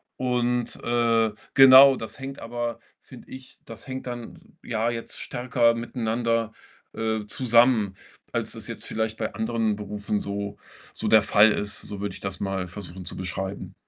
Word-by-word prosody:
und, 125 -1 -1
äh, 115 -2 +2 0.2
genau, 135 0 +9
das 115 - -8
hängt 135 0 -7
aber, 120 0 -4 0.2
finde - - -15
ich 130 0 -12
das 115 +2 -10
hängt 130 -1 -6
dann 120 -1 -7 0.2
ja 115 +1 -1
jetzt 115 -1 -5
stärker 120 -1 +1
miteinander, 115 -1 -1 0.4
äh, 110 -1 -2
zusammen, 115 -3 +3 0.4
als - - -2
das - - -7
jetzt - - -6
vielleicht 110 0 -2
bei 110 - -3
anderen 110 -1 -1
Berufen 105 0 -3
so 100 0 -4 0.4
so - - -4
der 110 -1 +7
Fall 105 +1 +5
ist. 100 -1 -1
So 100 -1 -7
würde 100 -2 -3
ich - - -9
das 95 -2 -4
mal 95 -2 -2
versuchen 95 -1 -8
zu - - -5
beschreiben. 95 +1 -5
115 Hz, 160 wpm, -25 LUFS, 105-120 Hz, 0.4 s, genau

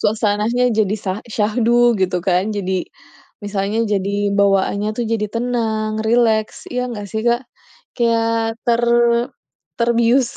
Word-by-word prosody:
suasananya 220 +3 +1
jadi 210 -2 +1
sa 190 - 0 0.2
syahdu 235 +2 +2
gitu 185 -1 +1
kan. 185 +1 +1
Jadi, 190 -2 -2 0.7
misalnya 205 +1 -2
jadi 200 +1 0
bawaannya 200 +1 +2
tuh 240 - -1
jadi 215 -2 0
tenang, 220 -2 -1
rileks 225 -2 +1
ya 250 0 -2
nggak 205 -3 -6
sih 220 - -1
Kak? 240 +2 +1 0.5
Kayak 230 -1 +1
ter 235 0 +2 1.0
terbius. 235 +2 +2
220 Hz, 120 wpm, -19 LUFS, 205-235 Hz, 1.0 s, syahdu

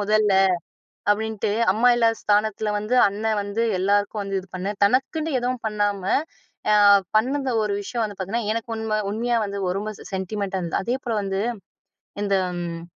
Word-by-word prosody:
முதல்ல. 210 0 +2 0.8
அப்டின்ட்டு 220 0 -1 0.2
அம்மா 225 +4 +3
இல்லாத 230 -1 +2
ஸ்தானத்ல 210 0 +1
வந்து 210 +4 -1
அண்ணன் 215 +1 -1
வந்து 205 +3 -2 0.2
எல்லாருக்கும் 205 +2 +1
வந்து 195 -1 -2
இது 190 - -16
பண்ணு. 190 +3 -2
தனக்குன்னு 290 - +1
எதுவும் 250 0 -2
பண்ணாம, 205 -2 -1 0.7
அ - - +5 0.4
பண்ணத 270 +4 0
ஒரு 210 -1 -1
விஷயம் 235 +2 -2
வந்து 205 -2 -8
பார்த்திங்கன்னா, 205 +4 -2
எனக்கு 230 0 -4
உண்ம 215 -1 -1
உண்மையா 235 +3 0
வந்து 200 0 -4
ஒரு 195 +2 -2
மச 215 - -8
சென்டிமென்ட்டா 190 0 -2
இருந்தது. 170 -1 -1
அதே 240 +5 0
போல 235 - -2
வந்து, 195 0 -2 0.8
இந்த 200 -1 +1 0.3
ம் 170 -1 -5
210 Hz, 155 wpm, -23 LUFS, 200-230 Hz, 0.8 s, அ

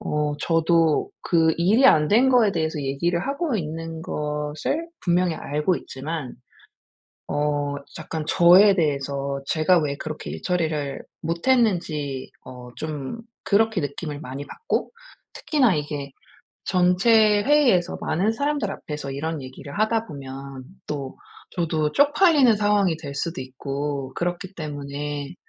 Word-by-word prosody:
어 150 -1 -1
저도 165 -1 +2
그 165 -2 +3
일이 205 +10 +4
안 150 - +5
된 245 +6 +5
거에 235 -6 +4
대해서 160 -3 -1
얘기를 140 +6 -1
하고 280 -2 -1
있는 165 -1 -5
것을 150 - -3
분명히 175 -1 +1
알고 150 +6 -1
있지만 140 0 -6 0.9
어 145 -1 -1 0.2
약간 160 -1 -5
저에 185 +5 +6
대해서 140 -4 -1
제가 165 +4 +3
왜 145 -2 -2
그렇게 155 +1 -6
일 - - -7
처리를 155 -6 -1 0.2
못했는지 170 - 0
어 125 -1 -10
좀 155 - -5 0.3
그렇게 220 -1 +2
느낌을 145 0 -5
많이 140 -1 -6
받고 460 - -3 0.4
특히나 260 - +2
이게 145 -1 -4 0.5
전체 205 +4 +4
회의에서 255 -12 +3
많은 195 +7 0
사람들 285 -3 -1
앞에서 150 -6 -6
이런 155 +2 -3
얘기를 130 +5 -9
하다 220 +1 +1
보면 135 -2 -8 0.2
또 140 -3 -5 0.3
저도 160 -3 -1
쪽팔리는 290 - +5
상황이 205 -4 +2
될 145 -4 -7
수도 165 +2 -3
있고 135 +1 -4
그렇기 175 +2 -3
때문에 145 -1 -5
160 Hz, 265 characters per minute, -23 LUFS, 145-195 Hz, 0.9 s, 저에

